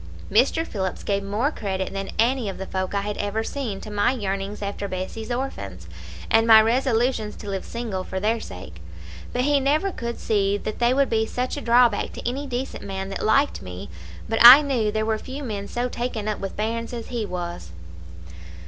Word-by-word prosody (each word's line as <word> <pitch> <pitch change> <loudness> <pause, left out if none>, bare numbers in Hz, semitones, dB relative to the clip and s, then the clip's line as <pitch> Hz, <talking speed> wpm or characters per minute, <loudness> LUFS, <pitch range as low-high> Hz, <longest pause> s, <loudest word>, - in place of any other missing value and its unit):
Mr. 265 +10 +3
Phillips 190 - -4
gave 200 -1 0
more 210 +9 0
credit 190 -7 -3
than 195 0 -4
any 235 -1 +2
of 195 - -6
the 190 - -5
folk 185 +1 -3
I 200 - +1
had 205 +1 -4
ever 205 +2 -1
seen 225 -6 -4
to 215 - -8
my 205 +3 +2
yearnings 200 -2 -3
after 200 0 -3
Bessie's 190 +4 -5
orphans, 100 - -4 0.4
and 225 0 +3
my 220 -1 +10
resolutions 230 -1 +1
to 210 - -10
live 195 -1 -3
single 225 -6 -4
for 190 - -4
their 220 +4 +1
sake; 90 - -10 0.5
but 250 - 0
he 290 +1 +3
never 300 +8 +1
could 235 -7 -5
see 200 -2 +1
that 215 +1 -5
they 240 0 +3
would 275 0 +2
be 220 -1 +2
such 250 +2 -2
a 290 - -5
drawback 235 -3 +3
to - - -6
any 275 +4 -3
decent 255 +1 -4
man 195 -1 -4
that 195 - -4
liked 275 +7 +2
me; 90 -2 -8 0.4
but 225 0 -1
I 255 +5 +12
knew 240 -7 0
there 215 0 -1
were 220 -1 0
few 275 +4 -7
men 205 -5 -4
so 245 +1 -2
taken 240 -3 -4
up 215 - -2
with 195 -1 -6
bairns 230 +3 -2
as 235 -1 -6
he 240 -3 -2
was. 175 - -5
220 Hz, 200 wpm, -24 LUFS, 195-245 Hz, 0.5 s, I